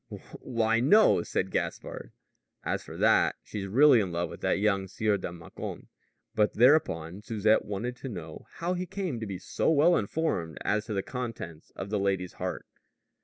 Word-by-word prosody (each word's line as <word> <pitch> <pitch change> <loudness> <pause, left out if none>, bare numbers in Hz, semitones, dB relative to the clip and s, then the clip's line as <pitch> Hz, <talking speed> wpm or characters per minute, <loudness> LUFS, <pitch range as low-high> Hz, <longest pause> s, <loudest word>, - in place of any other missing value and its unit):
"Why, 115 -1 +1
no," 155 - +5
said 95 +2 -2
Gaspard; - - -4 0.5
"as - - -1
for - - -10
that, - - +4
she's 100 -2 -5
really 130 +5 +6
in 95 -4 -1
love 85 +1 -2
with - - -10
that - - +1
young 100 -1 +1
Sieur 105 +2 0
de - - -5
Mâcon." 85 -1 -8 0.4
But 105 -1 +2
thereupon 105 - +3
Susette 110 0 +2
wanted 110 +5 -4
to 135 - -6
know 90 -8 -8
how 175 +2 -1
he 180 0 -3
came 185 -11 -3
to 110 - -5
be 95 -2 -4
so 90 - -1
well 160 +3 +5
informed 100 - -1
as 105 0 +1
to 110 - -3
the 95 - -1
contents 115 - -6
of 100 - -6
the 105 - +1
lady's 95 -2 -1
heart. - - -3
105 Hz, 175 wpm, -28 LUFS, 95-125 Hz, 0.5 s, really